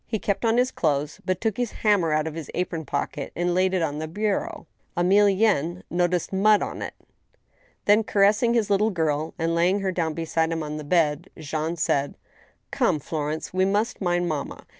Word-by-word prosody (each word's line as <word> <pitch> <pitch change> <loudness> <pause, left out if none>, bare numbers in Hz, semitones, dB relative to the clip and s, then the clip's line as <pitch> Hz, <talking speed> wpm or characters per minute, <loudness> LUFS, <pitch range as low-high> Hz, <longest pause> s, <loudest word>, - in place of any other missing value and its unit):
kept 200 +2 -1
on 230 0 +2
his 250 +1 +2
clothes, 150 -2 -1
but 185 -1 0
took 220 -1 -1
his 245 -3 -2
hammer 200 -7 +3
out 155 0 +1
of 160 - -4
his 160 -2 -7
apron 175 -2 -2
pocket 140 0 -3
and 175 +1 0
laid 185 +1 +2
it 185 -3 0
on 150 -1 -2
the 155 - -4
bureau. 205 +3 -2 0.3
Emilienne 190 -2 +3
noticed 175 +1 0
mud 210 +2 +4
upon - - -5
it. - - -5 0.9
Th^n, 210 +1 +4
caressing 210 +4 +3
his 215 -3 +1
little 205 +2 +3
girl 160 -4 -1
and 165 0 0
laying 180 +4 +2
her 190 -1 0
down 165 -4 -1
beside 165 0 0
him 165 -1 -2
on 150 0 -5
the 150 - -6
bed, 155 +1 +1
Jean 155 +2 -3
said: 145 -4 0
*• - - -31 0.6
Come, - - +2
Florence, 155 +2 -4
we 185 0 +2
must 205 +5 0
mind 175 -1 +1
mamma. 155 -4 -4
175 Hz, 190 wpm, -25 LUFS, 160-200 Hz, 0.9 s, mud